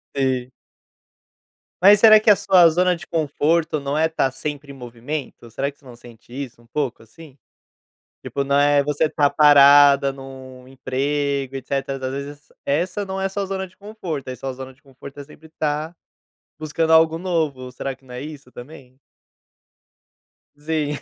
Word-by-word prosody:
Sim. 130 Hz, -2 st, -1 dB, 1.3 s
Mas 205 Hz, +3 st, +7 dB
será 215 Hz, 0 st, +8 dB
que 215 Hz, -, +1 dB
a 210 Hz, -, +8 dB
sua 190 Hz, -4 st, +5 dB
zona 180 Hz, +2 st, +1 dB
de 170 Hz, -, -11 dB
conforto 155 Hz, 0 st, 0 dB
não 140 Hz, +1 st, -3 dB
é 160 Hz, +1 st, +3 dB
tá 160 Hz, -4 st, 0 dB
sempre 145 Hz, +1 st, -6 dB
em -, -, -11 dB
movimento? 125 Hz, +1 st, -7 dB
Será 140 Hz, +5 st, -3 dB
que 140 Hz, -, -32 dB
você 145 Hz, -, -26 dB
não 125 Hz, -2 st, -12 dB
sente 120 Hz, -1 st, -17 dB
isso 130 Hz, -3 st, -7 dB
um 120 Hz, -, -24 dB
pouco, 125 Hz, -2 st, -4 dB
assim? 140 Hz, +5 st, -16 dB, 0.9 s
Tipo, 140 Hz, -, -3 dB
não 140 Hz, +1 st, 0 dB
é 145 Hz, 0 st, +4 dB
você 150 Hz, +2 st, 0 dB
tá 145 Hz, -2 st, +1 dB
parada 145 Hz, -1 st, +6 dB
num 130 Hz, -1 st, -12 dB
emprego, 135 Hz, +1 st, -3 dB
etc. 135 Hz, +1 st, -3 dB
e 130 Hz, -, -9 dB
às 130 Hz, -, -3 dB
vezes 145 Hz, +1 st, -8 dB, 0.2 s
essa 180 Hz, +8 st, -1 dB
não 190 Hz, 0 st, -5 dB
é 190 Hz, -, 0 dB
a -, -, -1 dB
sua 195 Hz, +1 st, -4 dB
zona 190 Hz, 0 st, -4 dB
de 185 Hz, -, -23 dB
conforto, 190 Hz, -10 st, -7 dB
aí, 130 Hz, -, -5 dB
sua 135 Hz, 0 st, -5 dB
zona 130 Hz, 0 st, -10 dB
de 135 Hz, -, -33 dB
conforto 135 Hz, 0 st, -13 dB
é -, -, -8 dB
sempre 155 Hz, +2 st, -17 dB
tá 155 Hz, +1 st, -3 dB, 0.7 s
buscando 160 Hz, +1 st, -1 dB
algo 160 Hz, 0 st, +4 dB
novo, 155 Hz, -8 st, -2 dB
será 135 Hz, +1 st, -5 dB
que 135 Hz, -, -34 dB
não 125 Hz, -, -12 dB
é 125 Hz, -, -6 dB
isso 145 Hz, -3 st, -10 dB
também? 130 Hz, 0 st, -13 dB, 1.6 s
Sim. 150 Hz, -1 st, -2 dB
145 Hz, 175 wpm, -21 LUFS, 135-160 Hz, 1.6 s, será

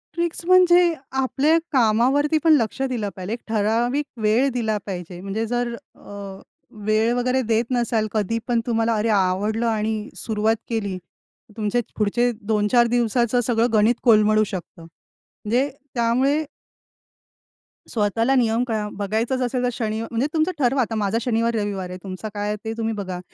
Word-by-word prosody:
Tricks 340 Hz, 0 st, -2 dB
म्हणजे 355 Hz, -1 st, +5 dB, 0.2 s
आपल्या 265 Hz, +4 st, +2 dB
कामावरती 265 Hz, +5 st, +3 dB
पण 325 Hz, -1 st, +6 dB
लक्ष 230 Hz, +1 st, -2 dB
दिलं 245 Hz, -6 st, -1 dB
पाहिजे. 185 Hz, +3 st, -5 dB
एक 240 Hz, -, -4 dB
ठराविक 230 Hz, +6 st, 0 dB, 0.2 s
वेळ 220 Hz, +5 st, +3 dB
दिला 220 Hz, -3 st, 0 dB
पाहिजे, 180 Hz, -2 st, -6 dB
म्हणजे 200 Hz, +4 st, -3 dB
जर 240 Hz, 0 st, -1 dB, 0.2 s
अ, 200 Hz, -1 st, -9 dB, 0.5 s
वेळ 215 Hz, +2 st, +2 dB
वगैरे 255 Hz, +1 st, +1 dB
देत 230 Hz, 0 st, +1 dB
नसाल, 235 Hz, -3 st, +1 dB
कधीपण 230 Hz, +3 st, -1 dB
तुम्हाला 230 Hz, -1 st, +1 dB
अरे 215 Hz, +1 st, 0 dB
आवडलं 205 Hz, +3 st, +1 dB
आणि 215 Hz, -1 st, -1 dB
सुरुवात 220 Hz, 0 st, 0 dB
केली 200 Hz, -5 st, -2 dB
तर 185 Hz, +3 st, -23 dB
तुमचे 215 Hz, +2 st, 0 dB, 0.2 s
पुढचे 240 Hz, +4 st, +1 dB, 0.2 s
2-4 220 Hz, +3 st, +3 dB
दिवसाचं 240 Hz, 0 st, +1 dB
सगळं 230 Hz, 0 st, +2 dB
गणित 220 Hz, +3 st, +4 dB
कोलमडू 215 Hz, -2 st, +5 dB
शकतं, 185 Hz, -4 st, -7 dB
म्हणजे 220 Hz, -, -4 dB, 0.3 s
त्यामुळे 255 Hz, +6 st, +2 dB, 1.4 s
स्वतःला 230 Hz, +4 st, +1 dB
नियम 235 Hz, -1 st, +2 dB
काय 220 Hz, -2 st, -1 dB
अ, 210 Hz, -, -3 dB
बघायचंच 220 Hz, +6 st, -1 dB
असेल 250 Hz, 0 st, -1 dB
तर 250 Hz, -, +2 dB
शनिव 220 Hz, -1 st, -2 dB
म्हणजे 235 Hz, +4 st, 0 dB
तुमचं 320 Hz, +2 st, +1 dB
ठरवा. 265 Hz, 0 st, +2 dB
आता 225 Hz, -2 st, -2 dB
माझा 210 Hz, 0 st, 0 dB
शनिवार-रविवार 220 Hz, -5 st, -1 dB
आहे. 180 Hz, -, -6 dB
तुमचा 195 Hz, +2 st, -6 dB
काय 205 Hz, 0 st, -3 dB
आहे 210 Hz, -, -1 dB
ते 225 Hz, -, -2 dB
तुम्ही 225 Hz, -1 st, -1 dB
बघा. 190 Hz, -4 st, -5 dB
225 Hz, 150 wpm, -22 LUFS, 210-245 Hz, 1.4 s, पण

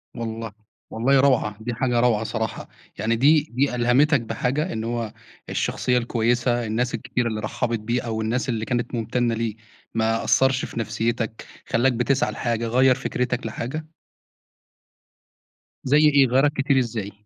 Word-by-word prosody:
والله، 115 Hz, -1 st, -5 dB, 0.4 s
والله 130 Hz, +5 st, +2 dB
روعة، 130 Hz, -6 st, +2 dB
دي 120 Hz, +1 st, -3 dB
حاجة 120 Hz, 0 st, +1 dB
روعة 115 Hz, -3 st, +2 dB
صراحة، 110 Hz, -1 st, -4 dB, 0.3 s
يعني 115 Hz, +1 st, 0 dB
دي 145 Hz, +6 st, +5 dB
دي 130 Hz, +1 st, 0 dB
ألهمِتَك 125 Hz, +4 st, +3 dB
بحاجة، 125 Hz, +9 st, -2 dB
إن 110 Hz, -, -3 dB
هو 115 Hz, -1 st, -3 dB, 0.4 s
الشخصية 125 Hz, 0 st, 0 dB
الكويسة، 120 Hz, 0 st, 0 dB
الناس 120 Hz, +3 st, -1 dB
الكتيرة 120 Hz, -1 st, -2 dB
اللي 110 Hz, -2 st, -3 dB
رحَّبِت 115 Hz, +2 st, -2 dB
بيه، 120 Hz, +4 st, -1 dB
أو 110 Hz, -1 st, -3 dB
الناس 120 Hz, +4 st, -1 dB
اللي 115 Hz, -2 st, -1 dB
كانت 120 Hz, 0 st, -2 dB
ممتنة 120 Hz, +1 st, 0 dB
له، 115 Hz, -1 st, -2 dB, 0.4 s
ما 115 Hz, 0 st, 0 dB
أثرش 130 Hz, 0 st, +3 dB
في -, -, -6 dB
نفسيتَك، 115 Hz, +1 st, -2 dB, 0.2 s
خلّاك 125 Hz, +2 st, +2 dB
بتسعى 135 Hz, +4 st, +1 dB
لحاجة، 115 Hz, -2 st, -2 dB
غيَّر 130 Hz, +2 st, +4 dB
فكرتَك 125 Hz, 0 st, -2 dB
لحاجة؟ 130 Hz, +7 st, -4 dB, 2.0 s
زي 140 Hz, +3 st, +4 dB
إيه، 145 Hz, -3 st, +5 dB
غيَّرَك 135 Hz, +4 st, +3 dB
كتير 135 Hz, -1 st, +2 dB
إزاي؟ 110 Hz, -5 st, -3 dB
120 Hz, 145 wpm, -23 LUFS, 115-130 Hz, 2.0 s, دي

